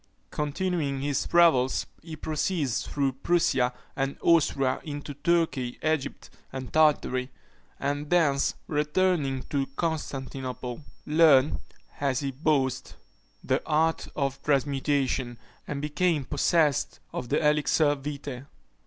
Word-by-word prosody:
Continuing 150 -2 -1
his 145 0 -1
travels, 160 -7 +4 0.2
he 160 -1 -8
proceeded 155 -1 -1
through 140 +2 -1
Prussia 135 -3 +1 0.2
and 135 0 -2
Austria 140 -6 +3
into 145 -1 -6
Turkey, 145 -4 0
Egypt, 155 -3 -2 0.2
and 130 -1 -7
Tartary, 145 -5 +3 0.5
and 145 +1 -2
thence 150 -6 +2
returning 150 -3 0
to 140 -2 0
Constantinople, 130 -5 -4 0.2
learned, 150 -3 +5 0.4
as 140 -2 0
he 140 -1 -2
boasted, 135 -2 0 0.5
the - - +1
art 160 +1 +1
of 135 -1 -2
transmutation, 135 -3 0 0.3
and 140 -1 -4
became 150 -1 +1
possessed 150 0 +1
of 125 - -4
the - - +2
elixir 150 0 +3
vitæ. 140 -2 -6
145 Hz, 110 wpm, -27 LUFS, 135-155 Hz, 0.5 s, learned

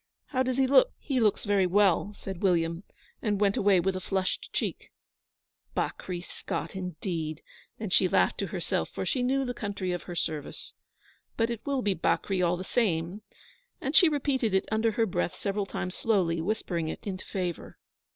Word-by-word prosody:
How 260 -3 +1
does 255 0 0
he 270 - +4
look?' 280 - +5
'He 270 -4 -1
looks 215 -3 +2
very 200 -3 +3
well,' 200 +1 +3
said 190 -3 -7
William, 170 -2 +2 0.4
and 205 -3 0
went 205 -1 +3
away 200 -2 +4
with 190 +2 +1
a - - -2
flushed 185 0 -2
cheek. - - -3 0.9
'Bakri 180 -2 -2
Scott, 180 - -5
indeed!' 165 -3 -4 0.3
Then 215 -4 -5
she 185 - +4
laughed - - +2
to - - -1
herself, - - -2
for - - -4
she 255 - 0
knew 265 +2 +2
the 245 - -2
country 200 -5 -3
of 175 - -2
her 175 - -4
service. 155 -3 -4 0.6
'But 230 +1 +2
it 230 -2 -4
will 275 -3 0
be 205 - +2
Bakri 185 +2 +1
all 175 0 +2
the 185 - -5
same'; 185 -3 0 0.6
and 275 +3 -3
she 345 - +8
repeated 265 -8 +1
it 190 - +2
under 220 +1 +2
her 225 +1 +2
breath 85 - -1
several 200 0 -1
times 180 -1 -3
slowly, 180 -8 +1
whispering 175 -3 -1
it - - -6
into 190 -2 -4
favour. 180 -3 -4
195 Hz, 180 wpm, -29 LUFS, 180-225 Hz, 0.9 s, she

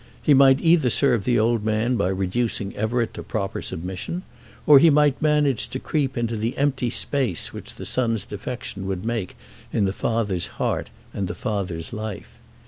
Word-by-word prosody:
He 150 - +5
might 135 0 +6
either 165 -6 +4
serve 120 -4 +2
the 125 - +2
old 115 0 +2
man 110 +3 +1
by 115 - +1
reducing 100 +2 -1
Everett 115 +2 -1
to - - -7
proper 100 -2 -3
submission, 95 - -5 0.4
or 145 -2 +9
he 165 +3 +6
might 145 -2 +3
manage 150 -5 +2
to 130 - -4
creep 135 -4 -1
into 115 -1 -1
the 110 +2 -2
empty 135 -3 +1
space 125 - -1
which - - -9
the - - -8
son's 115 -5 0
defection 105 -2 -6
would 95 +1 -3
make 115 -5 -3 0.3
in 105 - +1
the 95 - -1
father's 105 -6 -1
heart - - -1 0.2
and 100 -2 -2
the - - -5
father's 90 -4 -3
life. 110 -3 -7
115 Hz, 175 wpm, -23 LUFS, 100-135 Hz, 0.4 s, or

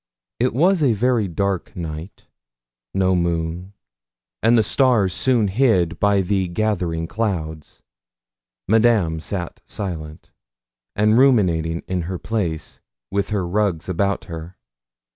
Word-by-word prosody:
It 125 0 +1
was 175 +5 +3
a 135 -6 +4
very 115 -1 +1
dark 95 +1 -2
night 80 +1 -7 0.7
no 95 -1 +2
moon, 85 +2 -2 0.7
and 115 +2 +4
the 110 - +4
stars 110 -5 +2
soon 120 -2 +2
hid 95 -7 +2
by 100 -1 +3
the 95 0 0
gathering 85 -4 -1
clouds. 80 -7 -4 0.8
Madame 110 -7 +3
sat 90 +1 -5
silent, 80 -6 -6 0.6
and 105 +3 +4
ruminating 85 -11 +3
in 90 -1 -1
her 95 - -3
place, 90 -7 -3 0.3
with 100 0 -1
her 100 -4 -1
rugs 95 -3 0
about 100 +2 0
her. 85 +1 -8
95 Hz, 120 wpm, -21 LUFS, 85-110 Hz, 0.8 s, a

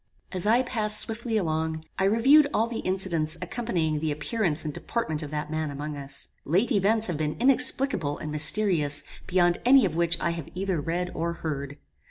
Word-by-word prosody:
"As 185 +1 -2
I 235 +4 +4
passed 215 -4 +3
swiftly 225 0 +1
along, 160 -3 -2
I 190 - +2
reviewed 265 +9 +5
all 220 - +3
the 230 -1 -5
incidents 170 -4 -1
accompanying 180 -6 -2
the 155 0 -1
appearance 155 +1 -1
and 150 - -3
deportment 160 -8 -3
of 150 - -6
that 150 0 -4
man 155 -1 -2
among 145 +1 -5
us. 140 0 -2
Late 190 - +1
events 215 +1 +2
have 175 -6 -1
been 150 0 -2
inexplicable 255 - +1
and 155 - -6
mysterious 155 -2 +2 0.2
beyond 175 -1 +2
any 260 -1 +6
of 165 -4 -2
which 170 0 +1
I 170 - 0
have 165 -3 -6
either 185 -4 -1
read 175 +3 -3
or 170 +1 -2
heard. 145 -4 -5
170 Hz, 185 wpm, -26 LUFS, 155-215 Hz, 0.2 s, any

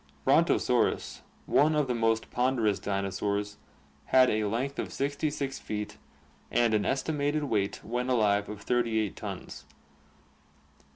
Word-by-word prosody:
Brontosaurus, - - +2 0.2
one 155 +3 +3
of 150 -1 +2
the 125 - -1
most 115 -1 0
ponderous 125 -5 +1
dinosaurs, 100 +1 -2 0.5
had 130 -1 +5
a 110 0 0
length 125 +7 -2
of - - -3
66 145 0 -2
feet 105 -1 -5 0.5
and 120 -2 +2
an 105 -1 +1
estimated 145 +2 0
weight 105 -8 -1
when 125 +2 -2
alive 105 -4 +2
of 105 -1 -8
38 115 -4 0
tons. - - -7
115 Hz, 120 wpm, -29 LUFS, 105-135 Hz, 0.5 s, had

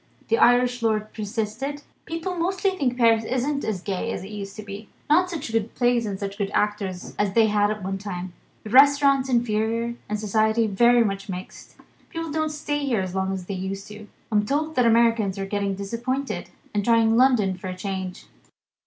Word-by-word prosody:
The 455 - +3
Irish 245 0 +4
lord 215 -1 0
persisted: 225 +7 -4 0.2
"People 330 +3 -4
mostly 380 +3 0
think 250 -7 -1
Paris 230 -2 +4
isn't 260 +5 -1
as 200 -5 -2
gay 195 -3 -2
as - - -4
it 195 - -9
used 200 -1 -7
to 215 - -7
be. 205 +1 -9 0.2
Not 360 +4 +4
such 310 -8 -5
good 225 0 -1
plays 240 -2 +2
and 195 -2 -4
such 200 0 -5
good 200 -1 -1
actors 205 -3 -1
as 205 -2 +1
they 225 0 +5
had 205 0 +2
at 210 -2 -4
one 195 +1 -3
time. 185 -3 -6 0.3
The 215 - -8
restaurants 275 0 +5
inferior, 230 -1 0 0.2
and 210 0 -1
society 220 +2 +2
very 235 +4 +4
much 195 -2 -3
mixed. 185 0 -8 0.3
People 330 -1 -5
don't 315 +1 0
stay 290 -1 -2
there 225 -6 +1
as 185 -1 -5
long 190 0 -1
as 190 -2 -4
they 200 - -5
used. 195 +2 -5 0.4
I'm 210 -1 +3
told 300 +7 -1
that 250 -5 +3
Americans 225 -4 +3
are 195 - -3
getting 200 0 -1
disappointed, 235 +7 -3 0.2
and 205 - +1
are - - -7
trying 230 -1 +4
London 235 -7 +4
for 185 +1 -8
a 185 0 -5
change." 190 -1 -5
220 Hz, 195 wpm, -24 LUFS, 200-250 Hz, 0.4 s, they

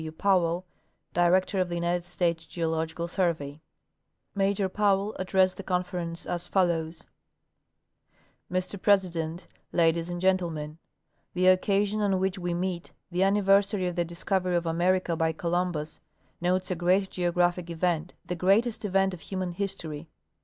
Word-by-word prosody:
W. 160 0 -5
Powell, 180 0 +1 0.5
Director 185 +3 +3
of 180 - -1
the 175 - -3
United 175 +1 0
States 170 -2 -1
Geological 165 0 -2
Survey. 160 -5 -1 0.7
Major 195 0 +1
Powell 200 +1 +1
addressed 185 0 +2
the 195 - -6
Conference 180 -2 -3
as 175 0 -4
folloAvs: 165 -4 0 1.5
Mr 185 +1 -2
President, 175 -4 +1 0.3
Ladies 165 0 +2
and 175 0 -4
Gentlemen; 165 -5 0 0.6
The 180 +1 +2
occasion 200 +3 +2
on 195 -2 +2
which 190 0 -1
we 175 -1 -2
meet, 180 -1 -3 0.2
the 180 +1 0
anniversary 195 0 +3
of 175 - -3
the 175 - +1
discovery 180 +2 -1
of 170 0 0
America 175 +1 +1
by 160 0 +1
Columbus, 170 -2 -2 0.4
notes 185 +1 0
a - - +1
great 185 +3 +2
geographic 175 0 0
event, 170 0 -1
the - - -3
greatest 205 +7 +2
event 195 -1 +2
of 180 - -7
human 185 0 -4
history. 170 -5 -5
180 Hz, 140 wpm, -27 LUFS, 170-190 Hz, 1.5 s, Director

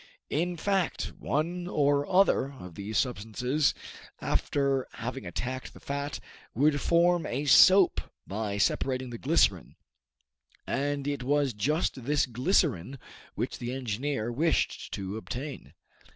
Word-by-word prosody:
In 175 +3 0
fact, 195 0 -1
one 175 +4 -1
or 145 -3 +1
other 180 -7 +3
of 90 -10 -10
these 100 +3 -4
substances, 125 +5 0 0.4
after 140 -2 0
having 120 -2 -5
attacked 130 +9 -5
the - - -12
fat, 140 0 -4 0.4
would 145 +3 +3
form 175 0 +3
a 135 +5 -2
soap 185 +8 +7 0.2
by 100 0 -3
separating 130 +5 0
the 115 - -7
glycerine, 130 - +2 0.9
and 140 0 -1
it 145 -2 -2
was 140 0 +1
just 130 +4 -1
this 145 +1 +2
glycerine 130 - +1 0.4
which - - -3
the 120 +1 -4
engineer 125 -1 -2
wished 160 +7 0
to 100 +1 -5
obtain. 130 +5 -7
135 Hz, 125 wpm, -29 LUFS, 120-150 Hz, 0.9 s, soap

